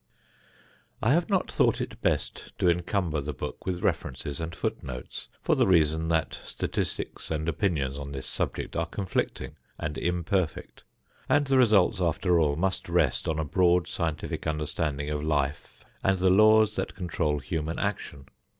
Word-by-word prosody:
I 120 - +4
have 170 +4 +1
not 190 -3 +1
thought - - +3
it - - -5
best - - -1
to - - +2
encumber 85 -2 +1
the 75 +2 -4
book - - -6
with 90 -1 -2
references 70 +2 -2
and 85 +1 -4
foot - - -2
notes, 65 -1 -7 0.2
for - - +3
the - - +3
reason 80 -3 +3
that 80 -3 +1
statistics - - -3
and 80 0 -2
opinions 80 -5 0
on 70 0 -6
this 70 -1 -6
subject - - -3
are 85 0 0
conflicting 95 +1 -3 0.2
and 75 -1 -4
imperfect, 90 -1 -1 0.5
and 145 0 +4
the 135 -1 +3
results 105 -4 +4
after 85 +1 +2
all 75 -3 +2
must 95 +4 -1
rest - - +2
on 80 - 0
a 80 - -1
broad 90 +2 +3
scientific 85 -8 -3
understanding 75 -1 -2
of 75 -1 -2
life 75 -2 -2 0.2
and 95 0 +3
the 95 0 +3
laws 110 +2 +5
that - - -3
control 80 -4 -1
human 80 +4 -3
action. 90 -8 -3
85 Hz, 160 wpm, -27 LUFS, 75-95 Hz, 0.5 s, laws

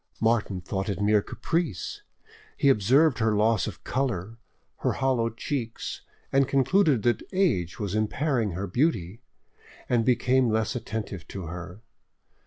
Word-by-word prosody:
Martin 110 -4 +1
thought 95 +3 -3
it 100 - -2
mere 105 0 +3
caprice; 160 - -3 0.6
he 140 - +4
observed 130 +5 +4
her 110 -1 +2
loss 110 0 +2
of - - -8
colour, 115 -5 -2 0.4
her - - 0
hollow 125 -4 +1
cheeks, 115 0 -4 0.3
and 135 -1 +3
concluded 140 - +3
that 120 -1 +2
age 130 - +1
was 100 -2 -3
impairing 110 - 0
her 95 +3 -3
beauty, 110 - 0 0.7
and 120 -2 +2
became 125 +1 +3
less 110 +3 0
attentive 110 -7 -5
to 95 - -6
her. 90 +5 -8
115 Hz, 135 wpm, -26 LUFS, 100-130 Hz, 0.7 s, he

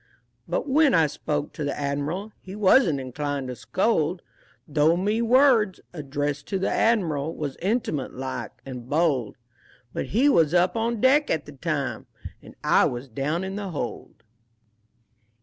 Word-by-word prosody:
But - - -2
when 290 -1 +4
I 160 - +5
spoke 150 0 -3
to 155 - -5
the 145 - -2
Admiral 145 +9 -2
He 190 +1 -9
wasn't 190 - +4
inclined 135 +1 -4
to 125 - -5
scold, 180 - 0 0.4
Though 155 +2 +3
me 210 +5 0
words, 235 -5 +4
addressed 145 -1 -3
to 195 - -1
the 190 - -1
Admiral, 165 -9 +1
Was 145 -3 -4
intimate 190 - -1
like 130 0 -6
and 125 -2 -8
bold, 145 -8 +1 0.6
(But - - -3
he 240 - +2
was 165 - +4
up 180 +1 +3
on 230 -1 -1
deck 280 +3 +4
at 155 - 0
the 150 - -10
time 145 -1 -3 0.3
And - - -14
I - - +4
was 125 +2 -4
down 145 +9 -2
in 190 +1 -4
the 200 -2 -4
hold). 145 -8 -6
160 Hz, 155 wpm, -25 LUFS, 140-205 Hz, 0.6 s, I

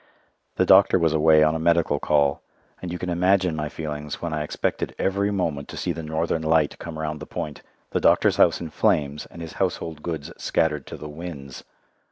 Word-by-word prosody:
The - - +2
doctor - - +6
was 80 -1 +2
away 80 0 +5
on 75 0 +3
a 80 - -2
medical 85 -3 +2
call, 70 -2 +2 0.4
and 90 - -5
you 90 - -3
can 90 0 -4
imagine 90 0 +2
my 75 -1 -3
feelings 75 -2 -5
when 85 -2 -4
I 75 - -1
expected 75 - -2
every 100 +1 0
moment 85 -8 -2
to - - -8
see 90 - -1
the 85 0 -5
Northern 80 +1 -1
Light 80 -1 +1
come 85 -2 -7
round 75 -1 -3
the 75 - -9
point, 75 -1 -5 0.3
the - - +1
doctor's - - +4
house - - +4
in 80 -2 -6
flames 75 -8 0
and 85 - -10
his 80 - -8
household 85 -4 -2
goods 80 -4 -5
scattered 75 -3 0
to - - -7
the 75 - -8
winds! 75 -4 -8
80 Hz, 205 wpm, -24 LUFS, 75-85 Hz, 0.4 s, doctor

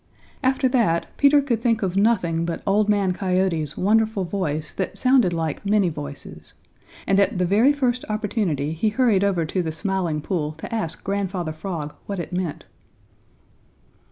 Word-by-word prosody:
After 265 0 +2
that, 225 -10 +2
Peter 285 0 +5
could 235 -5 -1
think 230 -3 +1
of 185 -1 -1
nothing 185 -6 +2
but 170 0 -4
Old 210 +2 +2
Man 200 -3 +2
Coyote's 180 -5 -1
wonderful 215 0 +2
voice 160 -5 -3
that 190 - -4
sounded 255 -7 +4
like 165 -1 -3
many 200 -2 +2
voices, 145 -2 -9 0.5
and 195 0 +3
at 200 -1 +2
the 180 - +1
very 215 +10 +4
first 250 -4 0
opportunity 205 - -1
he 190 +7 0
hurried 215 -3 +2
over 185 -5 +1
to 180 +4 -1
the 160 -2 -3
Smiling 175 -2 -1
Pool 155 -1 -2
to 160 +8 -8
ask 215 -8 -3
Grandfather 190 -4 -2
Frog 155 -3 -5
what 200 - -3
it 175 - -5
meant. 180 -4 -3
190 Hz, 160 wpm, -23 LUFS, 165-215 Hz, 0.5 s, Peter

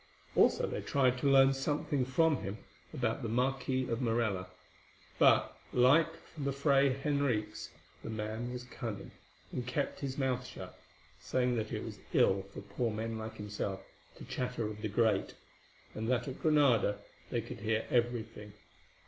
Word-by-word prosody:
Also - - +4
they - - -3
tried 130 -2 +2
to 140 - +2
learn 135 0 +7
something 145 0 0
from 150 +4 +3
him 100 -1 -5 0.3
about - - -1
the 115 - -3
Marquis 130 +2 0
of 115 +1 -2
Morella, 115 -6 0 0.7
but, - - +5 0.2
like 130 +7 +5 0.3
the 140 -3 -1
Fray 140 0 +3
Henriques, 135 -4 -1 0.3
the - - -6
man 110 +2 -3
was 125 0 -5
cunning, 115 -5 -6 0.4
and 125 -1 -4
kept 140 +3 -2
his 135 -2 -4
mouth 130 -2 0
shut, - - -9 0.5
saying 125 -1 0
that 110 -1 -2
it - - -3
was - - -7
ill 95 0 +4
for - - -8
poor 120 -2 -2
men 110 +1 -3
like 110 0 -6
himself 105 -2 -4 0.3
to - - -10
chatter 125 -2 -2
of 105 0 -5
the 110 - -2
great, 110 -2 +1 0.6
and 110 +2 -3
that 130 +2 +1
at 135 - -6
Granada 135 -10 +4 0.3
they - - 0
could - - -7
hear 110 +1 0
everything. 115 -4 -1
125 Hz, 155 wpm, -33 LUFS, 110-135 Hz, 0.7 s, learn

